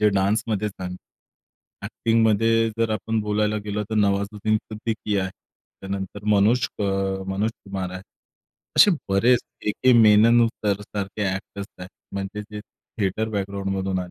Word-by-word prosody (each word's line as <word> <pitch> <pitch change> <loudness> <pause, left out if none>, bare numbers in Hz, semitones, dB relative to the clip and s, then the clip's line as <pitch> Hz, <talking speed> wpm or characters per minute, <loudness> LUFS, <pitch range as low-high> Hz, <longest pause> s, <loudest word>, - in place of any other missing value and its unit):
जे 105 - +5
डान्समध्ये 105 +1 +1
झालं. 90 -2 -7 0.9
ॲक्टिंगमध्ये 115 0 +2
जर 115 -1 +1
आपण 110 +1 -1
बोलायला 105 0 0
गेलो, 105 0 -2
तर 110 - -1
नवाजुद्दीन 100 +1 +1
सिद्दीकी 110 -1 -3
आहे, 95 0 -1 0.5
त्यानंतर 95 +1 -5
मनोज 110 +5 +3
अ, - - +1 0.4
मनोज 100 +3 0
कुमार 95 -2 -4
आहे, 95 0 -7 0.7
असे 205 - +8 0.2
बरेच 115 +5 +4 0.3
ए. - - +3
के. 130 +4 +3
मेनन 115 +2 +6
सर 105 -3 -2
सारखे 100 0 -5
एक्टर्स 100 +1 -7
आहेत, 90 +1 -9 0.2
म्हणजे 100 +1 -4
जे 105 0 -6
थिएटर 110 -2 -4
बॅकग्राउंडमधून 95 -1 -2
आले. 90 -1 -5
105 Hz, 135 wpm, -23 LUFS, 95-110 Hz, 0.9 s, असे